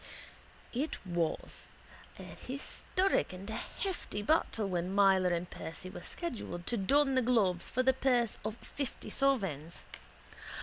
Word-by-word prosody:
It 275 +6 -1
was 170 -3 -2 0.5
a - - -8
historic 330 - -1
and 185 +2 -8
a - - -3
hefty 370 - -3
battle 225 -6 +2
when 180 -1 -1
Myler 195 -2 +5
and 175 0 0
Percy 175 +3 -7
were - - -7
scheduled 215 - -5
to 240 - +1
don 270 +8 +4
the 260 - +4
gloves 215 -8 +2
for 255 - +1
the 265 +1 +5
purse 250 -3 +2
of 215 +1 -2
fifty 280 -3 -5
sovereigns. 195 - +1
215 Hz, 135 wpm, -33 LUFS, 180-265 Hz, 0.5 s, Myler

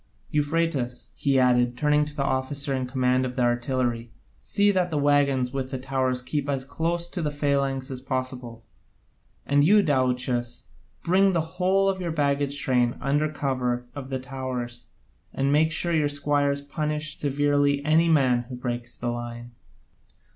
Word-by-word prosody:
Euphratus," 145 -4 -1
he 140 -1 +1
added, 125 -1 +3
turning 150 0 +2
to 150 0 -7
the 140 - -1
officer 135 +1 -1
in 130 -1 -2
command 130 0 +1
of 125 -1 -4
the 125 - +1
artillery, 120 -1 0 0.3
"see 205 0 +2
that 185 -2 +1
the 155 - -2
waggons 140 -3 +2
with 135 -1 -3
the 130 - -3
towers 130 -1 -1
keep 145 +2 -2
as 135 -2 -1
close 170 +4 -2
to 175 0 -5
the 150 - 0
phalanx 140 -2 -1
as 130 -1 -5
possible. 130 -3 -4 0.8
And 145 0 +3
you, 205 +6 +5
Daouchus, 125 -4 -1 0.3
bring 190 +3 +4
up 190 - +2
the 165 - +2
whole 185 +4 +1
of 190 -1 0
your 170 -2 -2
baggage 145 -2 +1
train 125 -3 +1
under 145 +3 +1
cover 125 -4 -2
of 135 -2 -7
the 135 - -1
towers 125 -2 -5 0.5
and 135 +1 +1
make 155 +2 +4
your 160 -4 +1
squires 145 0 +1
punish 150 +1 -3
severely 145 0 +1
any 160 +2 +4
man 130 -6 +3
who 125 - -6
breaks 120 -1 -4
the 120 - -3
line. 120 0 -6
140 Hz, 160 wpm, -25 LUFS, 125-150 Hz, 0.8 s, you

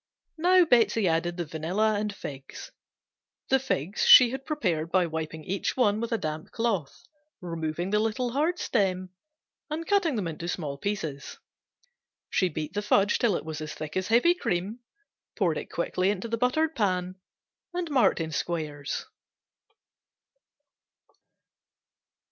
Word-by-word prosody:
Now 360 +2 +5
Betsey 230 - +3
added 170 +1 0
the 175 - -2
vanilla 175 +8 0
and 210 0 -1
figs 140 -8 -9 0.8
(the 265 - +4
figs 195 - -2
she 245 -2 +9
had 265 +1 -6
prepared 175 - -1
by 185 -2 +3
wiping 160 -1 -5
each 195 +8 -2
one 215 -4 +2
with 235 - -3
a 230 - +2
damp 155 -3 -5
cloth, 210 -11 -2 0.4
removing 170 +1 -3
the 210 - +3
little 225 +3 -1
hard 310 +7 +1
stem 185 - 0 0.6
and 315 +2 -3
cutting 350 - +2
into 170 -4 -4
small 150 -6 -4
pieces), 160 -9 -4 1.0
beat 155 -3 -1
the 205 - -1
fudge 205 0 +3
till 225 -6 +2
it - - -4
was 155 -1 -5
as 155 0 -6
thick 155 -1 -7
as 185 0 -1
heavy 245 +10 +5
cream, 200 - -2 0.6
poured - - 0
quickly 185 +1 0
into 205 +2 -2
the 230 - -1
buttered 300 +7 +1
pan 185 -3 -1 0.5
and 350 -2 -3
marked 260 -8 +3
in 160 -1 -3
squares. 150 -4 -3
195 Hz, 135 wpm, -27 LUFS, 160-235 Hz, 1.0 s, she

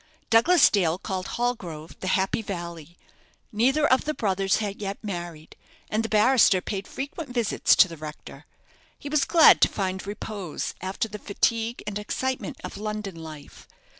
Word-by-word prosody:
Douglas 300 +9 +6
Dale 175 -5 +2
called 190 -1 -4
Hallgrove 180 -10 -3
the 185 - -5
Happy 195 +4 0
Valley. 170 -4 -7 0.5
Neither 265 +8 +2
of 260 +2 +3
the 305 0 -2
brothers 195 -2 +1
had 205 -1 -3
yet 195 -1 -3
married, 175 -6 -6 0.4
and 215 - +1
the 225 - -4
barrister 215 -2 +5
paid 195 +1 -5
frequent 285 +2 -6
visits 240 -3 +2
to - - +6
the 165 -2 -10
rector. 150 0 -10 0.5
He 285 - -8
was 300 -1 +2
glad 330 -2 +7
to - - +7
find 190 -1 -3
repose 205 -4 -5
after 190 +4 -2
the 210 0 -8
fatigue 230 +3 -1
and 210 0 -3
excitement 260 +5 -3
of - - -7
London 210 -1 -4
life. 155 -3 -11
205 Hz, 160 wpm, -25 LUFS, 185-235 Hz, 0.5 s, glad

